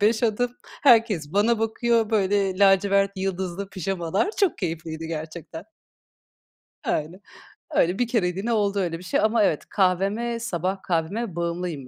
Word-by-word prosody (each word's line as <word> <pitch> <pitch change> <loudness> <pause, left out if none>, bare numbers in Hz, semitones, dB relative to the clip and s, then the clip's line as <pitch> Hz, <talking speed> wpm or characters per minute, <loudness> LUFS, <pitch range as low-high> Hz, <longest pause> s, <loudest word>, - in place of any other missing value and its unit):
5 220 +3 +2
adım. 240 +2 +1 0.3
Herkes 220 - +4
bana 215 +3 +3
bakıyor. 225 0 +1
Böyle, 195 -2 +1
lacivert, 200 0 +4
yıldızlı 190 0 -3
pijamalar 190 - -1
çok 385 - +2
keyifliydi 165 -3 -4
gerçekten. 160 +1 -7 1.2
Öyle. 165 +6 -2 0.5
Öyle 180 +5 +2
bir 245 - +2
kereliğine 205 0 0
oldu 205 -2 +1
öyle 170 -3 -1
bir - - -12
şey. 175 - 0
Ama 220 0 +3
evet, 155 - +1
kahveme 200 +5 +1
sabah 190 -3 -2
kahveme 180 +4 -2
bağımlıyım 170 -5 -3
195 Hz, 130 wpm, -24 LUFS, 170-220 Hz, 1.2 s, Herkes